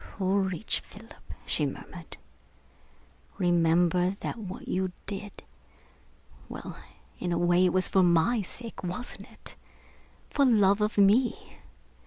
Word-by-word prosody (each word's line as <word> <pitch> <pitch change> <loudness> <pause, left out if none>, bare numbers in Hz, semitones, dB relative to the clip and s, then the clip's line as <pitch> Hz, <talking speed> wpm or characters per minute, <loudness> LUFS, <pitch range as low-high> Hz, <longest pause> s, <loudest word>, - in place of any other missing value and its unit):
"Courage, 190 0 0
Philip," 225 +3 -15
she - - 0
murmured. - - -9 1.2
"Remember 175 +1 +3
that - - -4
what 195 -3 -7
you 185 0 -1
did... 200 0 -6 1.1
well, - - -7 0.4
in 180 - -2
a 170 - +1
way 175 +1 +4
it - - +4
was 185 0 +2
for 190 - +3
my 180 +6 +3
sake, 225 +4 -9
wasn't 180 +8 -5
it? - - -9 0.7
for 280 - +1
love 210 -5 +4
of 210 +1 0
me? 210 +5 +3
190 Hz, 120 wpm, -28 LUFS, 180-210 Hz, 1.2 s, way